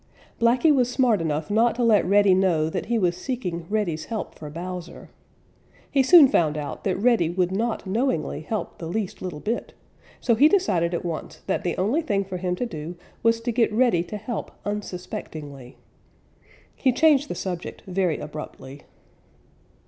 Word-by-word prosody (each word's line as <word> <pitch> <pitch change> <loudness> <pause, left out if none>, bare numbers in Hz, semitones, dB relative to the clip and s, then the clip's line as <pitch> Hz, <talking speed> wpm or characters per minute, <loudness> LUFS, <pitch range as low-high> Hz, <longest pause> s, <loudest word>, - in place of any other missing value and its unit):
Blacky 245 +6 +4
was 250 -3 +2
smart 245 -6 +2
enough 155 +1 -2
not 230 +3 +3
to 245 - -1
let 220 -3 +5
Reddy 200 0 +5
know 170 -4 +2
that - - -3
he 235 0 +1
was 180 -5 +1
seeking 180 -6 -4
Reddy's 190 -7 -1
help 225 -2 -5
for 150 - -9
Bowser. 175 +2 -7 0.8
He 275 - +4
soon 290 +2 +8
found 155 - +1
out 150 -1 -5
that 190 -2 +1
Reddy 220 -7 +3
would 180 +1 0
not 220 +3 -1
knowingly 190 - -1
help 215 +7 -4
the 165 - -5
least 195 +2 -3
little 180 -5 -5
bit, 225 +8 -3 0.4
so 235 - +2
he 285 +7 +6
decided 180 - +1
at 170 - -4
once 165 -2 -5
that - - -1
the 175 - -2
only 225 - +1
thing 200 -10 -1
for 185 -1 -5
him 180 0 -1
to 245 - -2
do 165 -5 -6 0.3
was 230 0 +3
to 240 +1 -1
get 230 -1 +2
Reddy 225 -6 +3
to 210 - -6
help 235 +2 -5 0.2
unsuspectingly. 155 -9 -6 1.0
He 260 - +2
changed 290 +1 +4
the - - -3
subject 180 -2 -5
very 185 -4 0
abruptly. 145 -2 -8
195 Hz, 170 wpm, -24 LUFS, 170-235 Hz, 1.0 s, soon